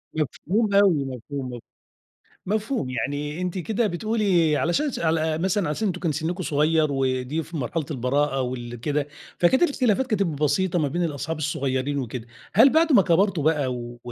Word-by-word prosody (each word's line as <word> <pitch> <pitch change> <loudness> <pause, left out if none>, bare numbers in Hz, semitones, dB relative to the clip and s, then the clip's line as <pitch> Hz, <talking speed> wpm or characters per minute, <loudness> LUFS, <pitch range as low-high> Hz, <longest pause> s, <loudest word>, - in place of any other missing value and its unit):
مفهوم 200 - -1
أوي، 190 -8 +4
مفهوم 130 0 -6
م 120 - -6 0.9
مفهوم. 215 - -1
يعني 145 +6 -3
أنتِ 180 +1 -2
كده 215 +5 0
بتقولي 185 -5 +1
علشان 280 - 0
ش - - -5
على 160 -1 +1
مثلًا 185 0 0
عشان 210 +8 -1
أنتم 180 -2 -3
كان 165 - 0
سِنُّكم 165 +5 -3
صغير 155 0 +2
ودي 135 +3 -1
في 165 +2 -7
مرحلة 145 +3 -2
البراءة 135 +1 0
وال 120 -1 -4
كده، 145 +1 -1 0.3
فكانت 260 - +4
الاختلافات 260 - +1
كانت 215 -5 +1
بسيطة 165 +2 0
ما 150 - +1
بين 175 +5 -1
الأصحاب 150 0 -3
الصغيرين 140 -2 -1
وكده. 120 -1 -5 0.3
هل 230 +8 +7
بعد 320 +3 +3
ما 210 - +7
كَبرتوا 185 -2 +2
بقى 145 -4 +1
و 120 0 -7
160 Hz, 165 wpm, -24 LUFS, 140-190 Hz, 0.9 s, هل